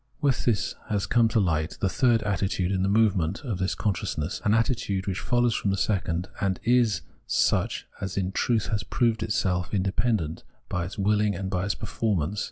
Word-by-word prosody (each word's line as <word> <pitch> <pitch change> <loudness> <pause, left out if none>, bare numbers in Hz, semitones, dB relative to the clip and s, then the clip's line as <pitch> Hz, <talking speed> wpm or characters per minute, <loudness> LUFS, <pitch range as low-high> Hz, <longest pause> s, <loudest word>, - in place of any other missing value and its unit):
With 140 -4 +1
this 115 -4 +1 0.2
has 100 -2 0
come 120 +1 +3
to 110 0 +1
light 80 -4 0
the 100 - +1
third 120 +1 +2
attitude 95 -2 0
in 95 -1 0
the 95 - +1
movement 100 -2 +2
of 110 -9 -3
this 95 +1 0
consciousness, 90 -4 -2
an 105 +1 +3
attitude 115 -5 0
which 95 -1 -2
follows 120 -1 +2
from 100 - -1
the 100 - 0
second 90 -3 0
and 95 -2 0
is 120 -3 +3 0.3
such - - +1 0.2
as 95 -1 -4
in 95 -1 0
truth 115 +2 0
has 105 -3 0
proved 115 -1 0
itself 90 -2 0
independent 95 -3 0 0.3
by 90 -2 -1
its 90 - -7
wilHng 105 -1 +1
and 95 -1 -3
by 90 +1 0
its 100 - -1
per - - -6
formance. 105 -3 -1
100 Hz, 190 wpm, -26 LUFS, 95-110 Hz, 0.3 s, come